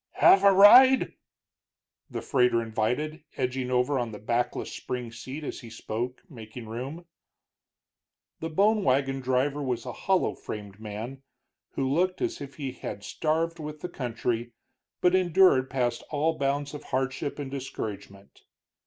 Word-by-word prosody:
"Have 195 - +6
a 200 - +8
ride?" 250 +7 +8 1.0
the - - -5
freighter 125 -4 +3
invited, 125 +8 -2
edging 130 0 -1
over 125 +2 +1
on 120 -2 -2
the 105 - -7
backless 120 +3 -2
spring 125 -2 -5
seat 130 +6 -7
as - - -5
he 120 - -11
spoke, 115 +3 -5
making 115 - -10
room. 135 +10 -6 1.3
The 160 - -4
bone 205 +6 +3
wagon 135 +1 +1
driver 130 +3 0
was 125 -4 -2
a 125 - -5
hollow 190 -1 +1
framed 105 -2 -8
man, 110 +5 -7 0.5
who 135 - -1
looked 180 +7 +1
as 355 -1 -2
if 140 -1 -8
he 135 -3 -4
had 105 -5 -7
starved 165 +6 -1
with 150 -1 -7
the 180 - -4
country 120 -4 -3 0.5
but 180 0 +4
endured 180 -7 +4
past 120 -3 -1
all 155 +2 0
bounds 140 +1 -1
of 150 - -8
hardship 130 +2 -2
and 140 -2 -5
discouragement. 105 -7 -7
135 Hz, 145 wpm, -27 LUFS, 120-155 Hz, 1.3 s, a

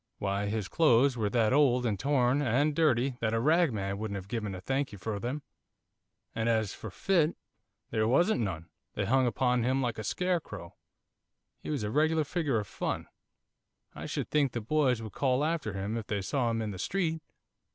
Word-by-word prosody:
'Why, 100 +1 -1
his 105 -1 -2
clothes 140 -4 +4
were 110 -4 0
that 110 +1 +2
old, 130 -4 +4
and 105 -4 0
torn, 135 -1 +2
and 145 +4 +2
dirty, 135 -5 +2
that 110 -1 0
a - - +2
ragman 115 - +1
wouldn't 110 -2 -3
have 95 -1 -6
given 105 -3 -3
a - - -6
thank 135 +8 -1
you 105 - -9
for 100 +2 -4
them, 130 +7 -4 0.9
and 115 +1 0
as 110 -3 +1
for 110 - -8
fit, 170 - +1 0.6
there 110 -1 +1
wasn't 170 - +3
none, 85 -6 -4 0.3
they - - -1
hung 130 +1 +3
upon 125 +2 +1
him 130 +3 +1
like 120 -4 -1
a - - -4
scarecrow 160 - -2 0.9
he - - -7
was 145 -7 -1
a 105 - -2
regular 155 +3 +2
figure 150 -5 -1
of 105 - -2
fun; - - -4 0.8
I - - -7
should - - -4
think 145 -4 +2
the 120 - -1
boys 125 -1 +1
would 110 - -8
call 135 +1 +1
after 155 - -1
him 100 +3 -3
if 115 -2 -4
they 100 -2 -2
saw 125 +3 0
him 115 -1 -1
in 105 - -3
the 95 - -8
street. 165 - -1
120 Hz, 195 wpm, -30 LUFS, 105-145 Hz, 0.9 s, clothes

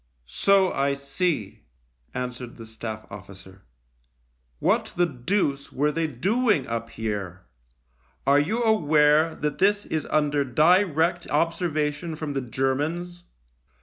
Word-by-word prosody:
"So 190 - +3
I 140 0 0
see," 140 - -2 0.5
answered 125 -1 -5
the 115 - -9
Staff 110 -1 -7
officer. 95 -1 -11 0.5
" - - -43
What - - +2
the 175 - +4
deuce 140 0 -1
were 150 +3 +1
they 165 +1 -1
doing 200 - +1
up 115 0 -4
here? 100 -5 -4 0.8
Are 140 +1 +5
you 215 +11 0
aware 155 -6 +4
that 150 -1 -3
this 205 +2 +3
is 155 -1 -3
under 145 -1 +1
direct 170 - +2
observation 165 -1 -1
from 150 -2 -4
the 135 - -1
Germans 150 +8 -2
145 Hz, 120 wpm, -25 LUFS, 120-170 Hz, 0.8 s, Are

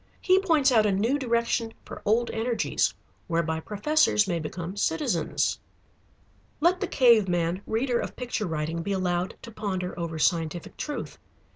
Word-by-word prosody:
He 370 0 +4
points 320 -8 +3
out 220 -3 +4
a - - +2
new 225 +9 +1
direction 235 -2 0
for - - -9
old 230 +3 +2
energies, 230 +1 0 0.4
whereby 165 -1 0
professors 210 - +2
may 175 -3 0
become 170 +4 -5
citizens. 165 -3 0 1.0
Let 355 +4 +3
the 390 - 0
cave 235 -7 +5
man, 175 +1 0
reader 240 +2 0
of - - -5
picture 240 -5 -3
writing, 160 +1 -2
be 200 +4 -2
allowed 180 -1 -1
to 230 - -9
ponder 185 -4 -3
over 165 -1 -3
scientific 165 +1 0
truth. 295 - -5
205 Hz, 150 wpm, -26 LUFS, 170-240 Hz, 1.0 s, cave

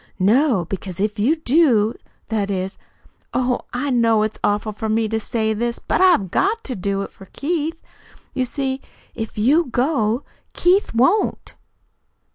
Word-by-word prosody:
"No. 220 - +3
Because 185 0 -6
if 210 +2 -1
you 255 +10 +3
do 255 -8 +3 0.4
That 210 -3 -1
is 190 0 -3 0.6
Oh, 250 -1 +1
I 260 +3 -2
know 230 -3 +3
it's 215 0 -3
awful 205 +1 +1
for 215 +1 -4
me 220 0 +1
to 220 +1 -1
say 220 0 -1
this, 235 +2 -2
but - - -1
I've 345 - +4
got 435 +4 +1
to 255 - -4
do 195 +1 -1
it - - -8
for 195 - -15
Keith. 325 - -2 0.5
You 255 - 0
see, 265 +1 -2 0.3
if 225 -1 -6
you 285 +11 +4
go, 245 -2 0 0.3
Keith 360 - +2
won't." 265 - +2
230 Hz, 155 wpm, -21 LUFS, 210-280 Hz, 0.6 s, I've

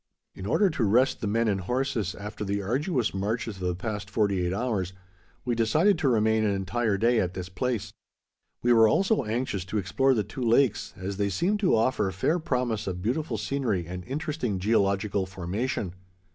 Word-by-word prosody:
In 95 - -7
order 195 - +3
to 145 -6 -1
rest 120 +7 +3
the 110 - -1
men 115 +3 +1
and 100 -2 0
horses, 120 -2 -1
after 105 +1 -6
the 100 0 -1
arduous 130 - 0
marches 105 +2 -2
of 90 -1 -3
the 90 - 0
past 105 0 -4
forty 100 -3 +1
eight 90 - 0
hours, 100 -4 -1 0.5
we 125 - +1
decided 155 - +3
to 145 -6 +2
remain 110 -1 +3
an 100 -2 +1
entire 100 +2 0
day 115 +3 +3
at 90 0 -1
this 90 -1 -5
place. 120 +2 -2 0.7
We 120 0 +5
were 115 -1 +7
also 195 - +2
anxious 110 -3 -2
to 100 +3 -3
explore 130 +7 +2
the 105 - +1
two 130 - -8
lakes, 120 0 +2
as 95 +1 -4
they 100 -1 +1
seemed 180 - 0
to 190 - +3
offer 110 -3 +1
fair 125 - 0
promise 125 -8 -1
of 90 -1 -4
beautiful 140 +8 -1
scenery 115 -11 -1
and 90 +2 -6
interesting 135 -6 -2
geological 100 -1 +1
formation. 95 +2 -3
110 Hz, 185 wpm, -27 LUFS, 95-125 Hz, 0.7 s, were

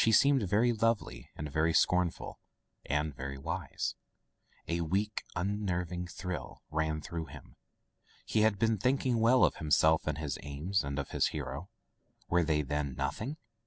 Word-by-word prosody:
She 110 - +4
seemed 140 +4 +5
very 110 +5 +3
lovely 110 - 0
and 75 -1 -5
very 80 +3 +2
scornful 90 -1 +1 0.3
— - - -43
and 75 0 -1
very 70 +1 -5
wise. 70 - -3 0.7
A 85 0 0
weak, 100 +6 0
unnerving 90 -2 -1
thrill 90 0 -6
ran 80 0 0
through 85 0 -4
him. - - -12 0.7
He 110 - +2
had 110 -2 +4
been 110 0 +2
thinking 125 0 +2
well 120 +3 +5
of - - +3
himself 80 +1 +3
and 75 -1 0
his 75 -3 -3
aims 75 +7 -1
and 70 0 -3
of 70 - -3
his - - +2
hero. 70 +5 -5 0.6
Were 90 0 +3
they, 75 -1 +1
then, 70 -1 -2
nothing 140 +8 -3
85 Hz, 160 wpm, -32 LUFS, 75-105 Hz, 0.7 s, seemed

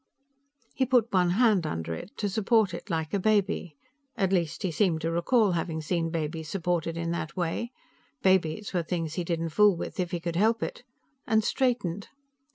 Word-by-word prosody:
He 265 -3 0
put 240 -3 +2
one 180 -2 +4
hand 205 -3 +3
under 80 - -3
it, 175 - -8
to 210 - -1
support 215 0 +2
it 170 - -7
like 160 -2 -2
a 200 - +2
baby 200 -5 +1 0.4
at 195 -4 +1
least, 170 0 0
he 185 - 0
seemed 165 -2 +1
to 165 - -1
recall 200 +5 +3
having 165 -1 -2
seen 165 +1 -1
babies 160 -1 -3
supported 170 -2 -1
in 165 0 -2
that 165 0 -4
way; 180 +7 -2 0.5
babies 190 +1 +2
were 180 - +1
things 165 -2 -3
he 175 - -2
didn't 165 -1 -2
fool 205 +2 +4
with - - -6
if 180 -1 0
he 175 -1 -3
could 170 0 -3
help 220 +3 +2
it - - -5 0.5
and 220 -1 +3
straightened. 210 -8 0
175 Hz, 185 wpm, -28 LUFS, 165-205 Hz, 0.5 s, one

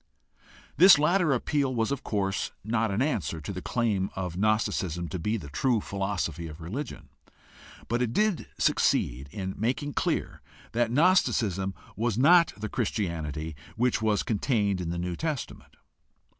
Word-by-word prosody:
This 180 +2 +9
latter 165 +2 +3
appeal 135 +1 0
was 115 +2 0
of 140 - -3
course 95 -2 -1
not 110 +1 0
an 100 +6 +1
answer 100 - -1
to 80 +6 -6
the 90 - -5
claim 105 -5 0
of 90 -3 -4
Gnosticism 95 -4 0
to 90 - -4
be 105 +7 -1
the 85 - -8
true 120 - +1
philosophy 95 -5 -3
of 75 0 -10
religion, 115 - -6 0.8
but 120 +2 0
it 120 -2 0
did 210 - +1
succeed 65 +3 +1
in 95 +2 -4
making 130 +7 -1
clear - - -1 0.3
that 120 0 +1
Gnosticism 110 - +2 0.2
was 115 0 -1
not 170 +6 +6
the 110 +1 -4
Christianity 80 - -3 0.2
which 125 0 +1
was 110 -2 +1
contained 105 -4 0
in 85 - -3
the 85 - -3
New 90 0 -3
Testament. 155 - -5
110 Hz, 150 wpm, -28 LUFS, 90-125 Hz, 0.8 s, This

